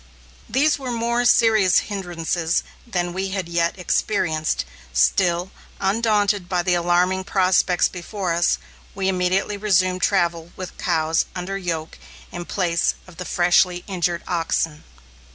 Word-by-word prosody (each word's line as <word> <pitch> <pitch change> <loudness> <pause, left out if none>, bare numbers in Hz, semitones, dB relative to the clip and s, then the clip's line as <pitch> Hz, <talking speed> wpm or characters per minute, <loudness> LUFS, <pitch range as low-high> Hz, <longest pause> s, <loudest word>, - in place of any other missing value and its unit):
These 290 +3 +2
were 265 -2 -5
more 235 +1 0
serious 220 -6 +5
hindrances 175 -4 -2 0.2
than 175 -5 -2
we 190 +1 -2
had 190 -2 -3
yet 170 +1 0
experienced. 165 - 0 0.3
Still, 175 - +2 0.3
undaunted 205 -2 +1
by 180 -2 0
the 180 0 +1
alarming 175 +2 +2
prospects 185 -2 +2
before 180 0 -4
us, 170 +1 +2 0.4
we 190 -1 -1
immediately 190 +2 0
resumed 185 -3 +2
travel 170 -4 +1
with 185 -1 -7
cows 160 -2 +1
under 185 +2 -4
yoke 170 -4 -4 0.3
in 175 0 -6
place 170 -3 0
of 185 -2 -16
the 180 - -6
freshly 175 0 +2
injured 175 -3 -1
oxen. 165 -3 -1
180 Hz, 130 wpm, -22 LUFS, 175-195 Hz, 0.4 s, serious